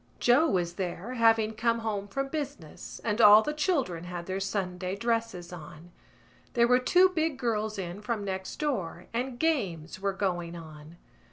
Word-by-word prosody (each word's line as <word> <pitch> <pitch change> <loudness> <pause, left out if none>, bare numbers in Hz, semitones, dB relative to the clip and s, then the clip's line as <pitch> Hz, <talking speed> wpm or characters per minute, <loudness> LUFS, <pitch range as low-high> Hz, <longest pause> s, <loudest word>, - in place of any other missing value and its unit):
Joe 250 +7 +5
was 175 -2 -1
there, 190 +5 -4
having 225 -2 +3
come 230 +1 +1
home 205 -3 -3
from 275 +6 -3
business, 270 - -6
and 220 0 0
all 210 0 +9
the 300 - -2
children 275 - 0
had 175 -1 -6
their 190 +1 -3
Sunday 190 -2 -2
dresses 215 -5 -2
on. 165 +1 -11 0.6
There 235 -1 +4
were 250 +1 +5
two 360 +9 +5
big 320 -5 -1
girls 220 -4 -1
in 185 +1 -5
from 210 -2 -3
next 190 -1 -4
door 190 - -3
and 245 +1 -2
games 190 - -1
were 195 0 -1
going 175 -3 -2
on. 155 0 -11
205 Hz, 165 wpm, -29 LUFS, 180-245 Hz, 0.6 s, all